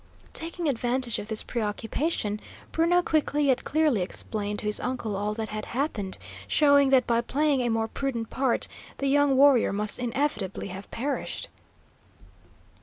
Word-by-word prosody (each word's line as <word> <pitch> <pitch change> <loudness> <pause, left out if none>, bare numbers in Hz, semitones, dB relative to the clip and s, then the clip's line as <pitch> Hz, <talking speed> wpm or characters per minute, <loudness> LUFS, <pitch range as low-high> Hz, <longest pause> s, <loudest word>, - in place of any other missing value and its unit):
Taking 335 0 -3
advantage 245 -2 0
of 205 - -6
this 220 -1 -1
preoccupation, 220 +1 -2 0.3
Bruno 350 +2 +3
quickly 295 -2 +1
yet 265 -2 +2
clearly 300 -9 +2
explained 205 +3 -3
to - - -1
his 210 0 +1
uncle 240 -5 -3
all 210 +2 -1
that 220 -1 -4
had 215 0 -4
happened, 215 -9 -1 0.3
showing 285 -2 +5
that 265 -1 +5
by 235 0 +2
playing 280 +2 +1
a 240 - 0
more 225 0 +1
prudent 235 -2 -3
part 260 -3 +1 0.3
the 275 - -2
young 280 -1 +4
warrior 275 -3 +6
must 210 +3 -2
inevitably 235 -7 -2
have 190 +2 -8
perished. 275 +4 -3
245 Hz, 150 wpm, -27 LUFS, 215-285 Hz, 0.3 s, warrior